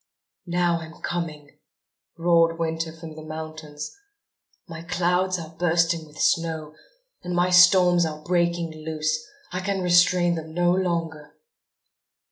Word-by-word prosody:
"Now 175 -1 +1
I'm 160 -1 -11
coming," 155 -4 -5 0.6
roared 165 -1 +3
Winter 165 0 -2
from 160 -1 -10
the 155 - -9
mountains. 155 - -7 0.7
"My 165 -1 -8
clouds 180 +2 0
are 165 -1 -9
bursting 170 -1 +1
with 150 0 -17
snow; 160 -2 0 0.5
and 180 - -4
my 175 +1 +2
storms 180 0 +6
are 155 -1 -4
breaking 170 -1 0
loose. 155 0 -1 0.3
I 180 - -3
can 190 0 -2
restrain 175 0 +4
them 160 -1 -6
no 175 0 +3
longer." 170 -4 -2
170 Hz, 125 wpm, -24 LUFS, 160-175 Hz, 0.7 s, storms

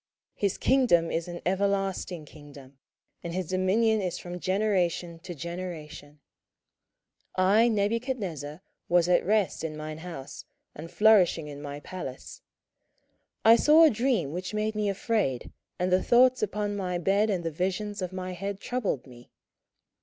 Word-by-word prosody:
his 200 -2 -1
kingdom 240 -11 +3
is 165 +1 -2
an 175 0 -6
everlasting 190 -3 -1
kingdom, 140 -3 -14 0.4
and 170 0 -5
his 185 -3 -3
dominion 205 +4 +2
is 180 -3 -2
from 180 0 -7
generation 185 -4 0
to 175 +1 -8
generation. 160 -3 -7 1.2
27:004:004 185 - +3
I 220 +4 +5
Nebuchadnezzar 200 - -2 0.3
was 175 -1 +4
at 180 - +3
rest 210 -3 +1
in 155 -1 -4
mine 155 0 -6
house, 160 -6 -8 0.3
and 160 +3 -9
flourishing 190 -8 +4
in 145 -1 -8
my 145 0 -6
palace: 145 -7 -8 1.0
27:004:005 225 - +8
I - - +9
saw 305 +6 +6
a 320 - +8
dream 225 - 0
which 185 +5 -5
made 215 +1 -1
me 210 -1 -1
afraid, 195 - -1 0.3
and 180 +1 -1
the 185 +1 +4
thoughts 255 +1 +4
upon 210 0 -2
my 180 -3 -2
bed 200 +5 +2
and 185 -4 -1
the 165 - -2
visions 190 +5 -3
of 185 -1 -3
my 185 0 -5
head 195 +2 -5
troubled 210 - -2
me. 120 -2 -15
185 Hz, 155 wpm, -27 LUFS, 165-210 Hz, 1.2 s, I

